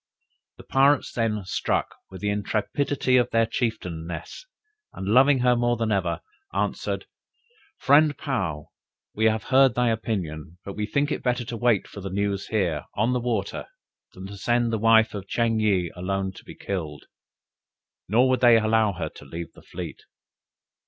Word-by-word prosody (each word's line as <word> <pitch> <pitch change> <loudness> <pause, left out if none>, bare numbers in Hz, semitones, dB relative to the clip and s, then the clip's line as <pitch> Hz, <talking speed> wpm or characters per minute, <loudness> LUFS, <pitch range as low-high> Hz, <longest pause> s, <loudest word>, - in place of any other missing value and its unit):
The - - -12
pirates, 140 +1 +3
then, 105 -4 -1
struck 95 - -1 0.2
with 95 - -10
the 105 0 0
intrepidity 125 +6 0
of 125 -1 +2
their 115 0 +3
chieftainess, 90 - -4 0.5
and 95 - -6
loving 130 +6 +5
her 125 0 +4
more 120 0 +1
than 115 -1 -1
ever, 90 -4 0 0.3
answered, - - -2 0.7
"Friend 145 +1 +4
Paou, 95 - -3 0.4
we 110 - 0
have 110 -1 +2
heard 135 -2 +4
thy 125 -1 +2
opinion, 90 -8 -3
but 100 - -6
we 105 +1 -3
think 145 +5 0
it - - -2
better 125 -1 0
to 120 - -5
wait 115 -3 +2
for 100 - -10
the 95 - -5
news 100 +1 -2
here, 90 -9 -1
on 115 +4 +1
the 125 - +1
water, 115 -5 -2 0.5
than 95 - -9
to 100 +1 -8
send 120 +2 +1
the 110 - 0
wife 110 0 +5
of 100 -2 -6
Ching 115 0 +1
yih 95 -6 +1
alone 95 +1 -2
to - - -14
be - - -11
killed." 80 -7 -5 1.0
Nor 120 +6 +4
would 130 -1 +1
they 120 -2 +7
allow 110 -1 +2
her 80 -3 -4
to 75 - -14
leave 85 +4 -7
the - - -16
fleet. - - -8
110 Hz, 170 wpm, -25 LUFS, 95-120 Hz, 1.0 s, they